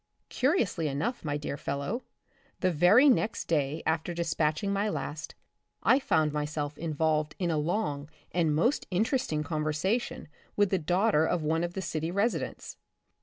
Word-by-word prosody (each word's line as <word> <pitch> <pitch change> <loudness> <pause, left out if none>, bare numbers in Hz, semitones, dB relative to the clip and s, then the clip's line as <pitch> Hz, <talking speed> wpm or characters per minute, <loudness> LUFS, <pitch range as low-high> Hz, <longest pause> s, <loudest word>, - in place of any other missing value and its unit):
Curiously 240 - +1
enough, 150 - -2
my 145 -2 -1
dear 145 -1 -4
fellow, 140 - -3 0.6
the 185 - +3
very 180 - +6
next 230 -4 +2
day 150 -1 0
after 160 +2 -1
dispatching 165 +2 0
my 200 +2 0
last, 150 -6 -5 0.5
I 265 - +5
found 155 - +1
my 150 0 0
self 150 -1 -3
involved 155 -1 0
in 175 -3 0
a 155 - 0
long 150 -4 -2 0.2
and 165 -4 +1
most 235 - +1
interesting 190 - 0
conversation 155 +9 -1 0.3
with 205 -2 +2
the 190 - +2
daughter 180 +1 +2
of 170 - 0
one 160 +2 +1
of 175 0 -4
the 190 - -3
city 160 -1 -2
residents. 200 +6 -2
165 Hz, 155 wpm, -29 LUFS, 150-200 Hz, 0.6 s, very